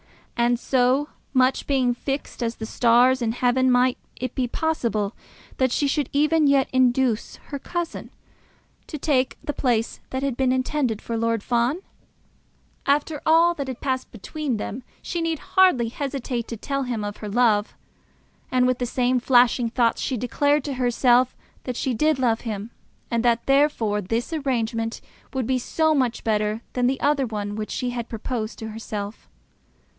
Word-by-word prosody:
And, 240 Hz, 0 st, +2 dB
so 260 Hz, +3 st, +2 dB, 0.2 s
much 260 Hz, 0 st, +2 dB
being 260 Hz, -3 st, +2 dB
fixed 270 Hz, +2 st, -4 dB
as 230 Hz, 0 st, -1 dB
the 220 Hz, -, -6 dB
stars 245 Hz, +3 st, +4 dB
in 225 Hz, -1 st, 0 dB
heaven, 255 Hz, +1 st, +2 dB
might 250 Hz, 0 st, +3 dB, 0.2 s
it 255 Hz, -1 st, -4 dB
be 255 Hz, -2 st, 0 dB
possible 235 Hz, -8 st, -1 dB, 0.4 s
that 260 Hz, -2 st, +2 dB
she 285 Hz, -, +1 dB
should 280 Hz, -1 st, 0 dB
even 305 Hz, +1 st, +3 dB
yet 275 Hz, -1 st, +4 dB
induce 255 Hz, -3 st, +2 dB
her 280 Hz, -, -8 dB
cousin 345 Hz, +3 st, -4 dB, 0.8 s
to 305 Hz, -, -5 dB
take 270 Hz, -3 st, +1 dB
the 295 Hz, -, -3 dB
place 235 Hz, -5 st, 0 dB
that 260 Hz, +1 st, -3 dB
had 275 Hz, -3 st, -1 dB
been 260 Hz, 0 st, +1 dB
intended 255 Hz, -3 st, 0 dB
for 230 Hz, -, -3 dB
Lord 230 Hz, -1 st, 0 dB
Fawn? 245 Hz, +7 st, +1 dB, 1.1 s
After 290 Hz, +1 st, +1 dB
all 335 Hz, +2 st, +5 dB
that 280 Hz, -5 st, -5 dB
had 260 Hz, -2 st, -5 dB
passed 260 Hz, -1 st, -2 dB
between 265 Hz, +3 st, -4 dB
them 215 Hz, +4 st, -5 dB, 0.2 s
she 345 Hz, -, -3 dB
need 330 Hz, -1 st, 0 dB
hardly 325 Hz, -10 st, +3 dB
hesitate 255 Hz, -2 st, -3 dB
to 230 Hz, -, -5 dB
tell 275 Hz, +5 st, -2 dB
him 240 Hz, -5 st, -2 dB
of 205 Hz, 0 st, -5 dB
her 210 Hz, -, -6 dB
love. 215 Hz, -2 st, +2 dB, 0.7 s
And 255 Hz, -1 st, +3 dB
with 255 Hz, -1 st, +1 dB
the 245 Hz, -, -1 dB
same 250 Hz, +1 st, +1 dB
flashing 245 Hz, -1 st, +4 dB
thoughts 235 Hz, -1 st, +1 dB
she 260 Hz, -, -1 dB
declared 285 Hz, +5 st, +1 dB
to 285 Hz, -, -3 dB
herself 250 Hz, 0 st, +3 dB, 0.3 s
that 250 Hz, -, -3 dB
she 260 Hz, -, -1 dB
did 305 Hz, +6 st, +2 dB
love 235 Hz, -3 st, +1 dB
him, 215 Hz, -1 st, -5 dB, 0.4 s
and 235 Hz, 0 st, +1 dB
that 235 Hz, -1 st, +2 dB
therefore 270 Hz, -7 st, +2 dB
this 230 Hz, -, -2 dB
arrangement 230 Hz, -6 st, -1 dB, 0.3 s
would 260 Hz, -3 st, -2 dB
be 255 Hz, +2 st, +1 dB
so 315 Hz, +5 st, +1 dB
much 255 Hz, -5 st, 0 dB
better 215 Hz, 0 st, 0 dB
than 250 Hz, -1 st, +1 dB
that 265 Hz, +1 st, 0 dB
other 285 Hz, -3 st, +2 dB
one 205 Hz, -2 st, -4 dB
which 215 Hz, 0 st, -4 dB
she 250 Hz, -1 st, -2 dB
had 240 Hz, -1 st, -5 dB
proposed 225 Hz, 0 st, -4 dB
to 220 Hz, -, -6 dB
herself. 215 Hz, -1 st, -6 dB
250 Hz, 170 wpm, -24 LUFS, 230-275 Hz, 1.1 s, all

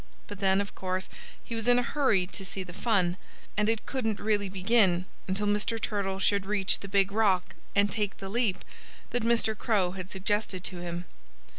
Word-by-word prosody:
But 205 Hz, -2 st, -8 dB
then, 195 Hz, 0 st, +3 dB
of 200 Hz, -, -6 dB
course, 185 Hz, 0 st, -2 dB, 0.3 s
he -, -, -7 dB
was 225 Hz, 0 st, -1 dB
in 245 Hz, 0 st, +6 dB
a 245 Hz, -, +3 dB
hurry 240 Hz, -9 st, +2 dB
to 195 Hz, +2 st, -7 dB
see 190 Hz, 0 st, -4 dB
the 175 Hz, -1 st, -10 dB
fun. 185 Hz, -4 st, +1 dB, 0.4 s
And 210 Hz, 0 st, +2 dB
it 225 Hz, -1 st, 0 dB
couldn't 225 Hz, -6 st, -1 dB
really 205 Hz, -2 st, +1 dB
begin 185 Hz, -2 st, +3 dB, 0.2 s
until 195 Hz, +2 st, 0 dB
Mr. 210 Hz, +2 st, +1 dB
Turtle 200 Hz, -3 st, -1 dB
should 195 Hz, 0 st, +1 dB
reach 205 Hz, -2 st, +2 dB
the 200 Hz, -, -7 dB
big 195 Hz, 0 st, +3 dB
rock 200 Hz, -4 st, +2 dB, 0.2 s
and 200 Hz, 0 st, +4 dB
take 210 Hz, -3 st, 0 dB
the 195 Hz, -, -6 dB
leap 215 Hz, -2 st, 0 dB, 0.5 s
that 245 Hz, -, 0 dB
Mr. 230 Hz, -1 st, +2 dB
Crow 205 Hz, -5 st, +1 dB
had 185 Hz, 0 st, -7 dB
suggested 190 Hz, -1 st, -1 dB
to 180 Hz, -2 st, -2 dB
him. 175 Hz, 0 st, -4 dB
200 Hz, 190 wpm, -29 LUFS, 190-220 Hz, 0.5 s, in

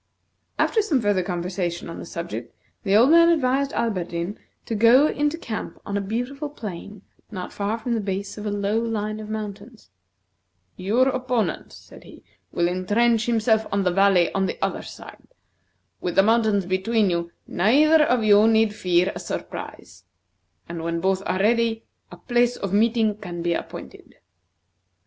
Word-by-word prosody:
After 445 Hz, -, +2 dB
some 330 Hz, -11 st, +1 dB
further 205 Hz, -4 st, +1 dB
conversation 175 Hz, -1 st, -3 dB
on 165 Hz, -, -7 dB
the -, -, -8 dB
subject, 125 Hz, -11 st, -6 dB, 0.3 s
the 195 Hz, -1 st, +1 dB
old 240 Hz, +7 st, +6 dB
man 335 Hz, 0 st, +7 dB
advised 275 Hz, -3 st, +1 dB
Alberdin 185 Hz, -4 st, -2 dB, 0.3 s
to -, -, -4 dB
go 230 Hz, +6 st, +6 dB
into 295 Hz, +1 st, 0 dB
camp 225 Hz, -9 st, -6 dB
on 200 Hz, -, -4 dB
a 200 Hz, -, 0 dB
beautiful 245 Hz, +8 st, -4 dB
plain 205 Hz, -, -8 dB, 0.3 s
not 185 Hz, -4 st, -7 dB
far 205 Hz, +2 st, -2 dB
from 235 Hz, +1 st, -3 dB
the 230 Hz, -, 0 dB
base 200 Hz, -1 st, -4 dB
of 210 Hz, 0 st, -6 dB
a -, -, 0 dB
low 205 Hz, +2 st, 0 dB
line 215 Hz, -2 st, -3 dB
of 215 Hz, 0 st, -8 dB
mountains. 215 Hz, -, -7 dB, 0.8 s
"Your 220 Hz, +8 st, +1 dB
opponent," 255 Hz, -3 st, -2 dB
said -, -, -15 dB
he, -, -, -15 dB, 0.3 s
"will 175 Hz, -, +1 dB
intrench 215 Hz, +6 st, +1 dB
himself 220 Hz, -1 st, +2 dB
in 200 Hz, 0 st, +1 dB
the 180 Hz, -, +2 dB
valley 195 Hz, -2 st, +3 dB
on 190 Hz, -1 st, +1 dB
the -, -, -4 dB
other -, -, -2 dB
side. -, -, -12 dB, 0.7 s
With 175 Hz, -, -3 dB
the 195 Hz, -, +6 dB
mountains 215 Hz, -3 st, +2 dB
between 190 Hz, +2 st, +1 dB
you, 170 Hz, 0 st, -2 dB
neither 295 Hz, -, +4 dB
of 245 Hz, -5 st, +1 dB
you 210 Hz, 0 st, +6 dB
need 220 Hz, -1 st, +3 dB
fear 180 Hz, -2 st, +1 dB
a -, -, -7 dB
surprise; 90 Hz, +1 st, -7 dB, 0.6 s
and 170 Hz, -1 st, -6 dB
when 170 Hz, 0 st, -2 dB
both 190 Hz, +2 st, 0 dB
are -, -, 0 dB
ready, 230 Hz, +2 st, +1 dB, 0.3 s
a -, -, -10 dB
place 240 Hz, 0 st, +1 dB
of 195 Hz, -1 st, -5 dB
meeting 220 Hz, 0 st, +2 dB
can 175 Hz, -4 st, -7 dB
be 170 Hz, 0 st, +1 dB
appointed. -, -, -8 dB
210 Hz, 165 wpm, -23 LUFS, 185-235 Hz, 0.8 s, man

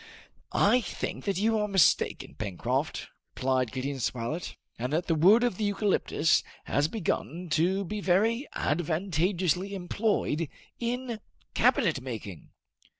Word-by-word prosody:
"I 250 Hz, -, +4 dB
think -, -, -5 dB
that 200 Hz, -3 st, 0 dB
you 220 Hz, +2 st, +2 dB
are 210 Hz, -, 0 dB
mistaken, 195 Hz, -5 st, +2 dB
Pencroft," 100 Hz, -5 st, -2 dB, 0.3 s
replied 130 Hz, -3 st, 0 dB
Gideon 135 Hz, +2 st, -3 dB
Spilett, 125 Hz, +8 st, -3 dB, 0.2 s
"and 125 Hz, +3 st, -2 dB
that 170 Hz, +3 st, +1 dB
the 165 Hz, -, +1 dB
wood 190 Hz, +10 st, +6 dB
of 240 Hz, -7 st, 0 dB
the 220 Hz, -, -2 dB
eucalyptus 200 Hz, -5 st, +2 dB, 0.2 s
has 145 Hz, +2 st, +1 dB
begun 175 Hz, -2 st, -3 dB
to 185 Hz, +6 st, +2 dB
be 210 Hz, +4 st, -4 dB
very 220 Hz, +9 st, +2 dB
advantageously 175 Hz, +3 st, 0 dB
employed 180 Hz, -5 st, -1 dB, 0.3 s
in 240 Hz, -1 st, -3 dB, 0.3 s
cabinet 220 Hz, -, +3 dB
making." 110 Hz, -, -7 dB
180 Hz, 125 wpm, -28 LUFS, 150-210 Hz, 0.3 s, wood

